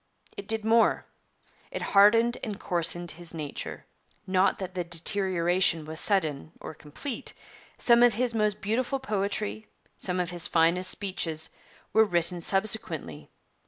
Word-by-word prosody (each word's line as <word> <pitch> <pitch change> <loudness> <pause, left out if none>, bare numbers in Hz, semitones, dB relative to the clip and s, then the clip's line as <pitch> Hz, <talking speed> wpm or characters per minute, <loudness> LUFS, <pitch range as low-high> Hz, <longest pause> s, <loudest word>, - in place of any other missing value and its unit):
It 200 - -8
did 220 0 0
more; 225 +1 +3 0.6
it - - -5
hardened 230 +4 +5
and 210 -5 -4
coarsened 175 0 -1
his 170 0 -10
nature. 150 -3 -6 0.4
Not 185 +1 +2
that 190 -2 -6
the 180 -1 -2
deterioration 175 -1 +1
was 155 0 -5
sudden 160 -6 0
or - - -8
complete. 160 - -7 0.4
Some 235 -1 +4
of 240 -1 +5
his 245 +1 +1
most 210 -2 0
beautiful 240 +6 0
poetry, 210 -2 -3 0.3
some 180 -1 -2
of 180 -1 -1
his 175 -1 -2
finest 170 +3 +3
speeches, 165 -5 -2 0.4
were 220 +1 +6
written 175 -3 0
subsequently. 170 - -1
185 Hz, 135 wpm, -27 LUFS, 170-215 Hz, 0.6 s, were